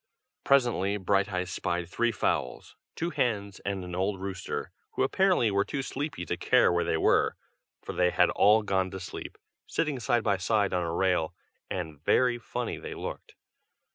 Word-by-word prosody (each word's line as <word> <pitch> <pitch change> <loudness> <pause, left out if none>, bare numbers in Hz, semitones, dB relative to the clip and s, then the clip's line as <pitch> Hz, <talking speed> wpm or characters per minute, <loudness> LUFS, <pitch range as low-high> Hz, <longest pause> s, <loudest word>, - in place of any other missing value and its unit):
Presently 120 -7 +3
Brighteyes 95 -1 0
spied 85 -2 -2
three 120 +6 +1
fowls, 70 - -2 0.2
two 170 +1 -2
hens 100 - -1
and 100 -2 -3
an 90 -1 -7
old 95 +2 -1
rooster, 95 -1 -4 0.2
who - - +1
apparently 180 - +3
were 100 0 +2
too 135 +5 -3
sleepy 135 - -4
to - - -2
care - - +4
where 85 - +2
they 80 - 0
were, - - +3 0.5
for - - -5
they 90 0 +3
had - - +3
all 105 +2 +5
gone 95 -2 0
to 95 - -7
sleep, 90 - -7 0.3
sitting 150 -5 -1
side 120 0 +1
by 100 -2 +2
side 100 +1 +1
on 90 - +1
a 85 -1 -2
rail, 85 -2 +1 0.3
and 80 -5 -5
very 125 +5 +3
funny 115 - -4
they - - -7
looked. - - -7
100 Hz, 170 wpm, -28 LUFS, 90-120 Hz, 0.5 s, all